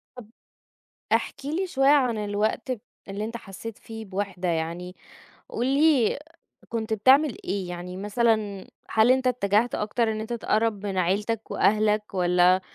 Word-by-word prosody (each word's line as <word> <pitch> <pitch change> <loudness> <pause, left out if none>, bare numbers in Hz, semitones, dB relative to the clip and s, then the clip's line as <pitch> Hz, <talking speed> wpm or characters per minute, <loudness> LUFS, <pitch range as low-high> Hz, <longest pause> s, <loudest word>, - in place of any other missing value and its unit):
طَب 225 -4 -11 0.8
احكِ 280 -1 0
لي 340 +6 -1
شوية 270 -4 +2
عن 255 -6 +4
الوقت 210 +4 -1
ب 240 - -3 0.3
اللي 200 +2 -3
أنت 230 +1 -5
حسّيت 210 +2 -9
فيه 225 -1 -9
بوحدة 190 -2 -3
يعني، 170 +2 -3 0.5
قُل 240 - -2
لي 280 -3 +3 0.5
كنت 220 -1 -2
بتعمل 260 +5 +4
إيه، 195 -3 -2
يعني 180 +1 -6
مثلًا 210 -1 0 0.2
هل 220 +3 +4
أنت 260 0 +2
اتجهت 225 -1 +1
أكتر 220 +2 0
إن 215 - -4
أنت 225 +2 -5
تقرّب 215 -2 0
من 195 -2 -3
عيلتك 205 +5 -1
وأهلك، 210 0 +2
والَّا 180 0 +4
215 Hz, 145 wpm, -25 LUFS, 195-235 Hz, 0.8 s, عن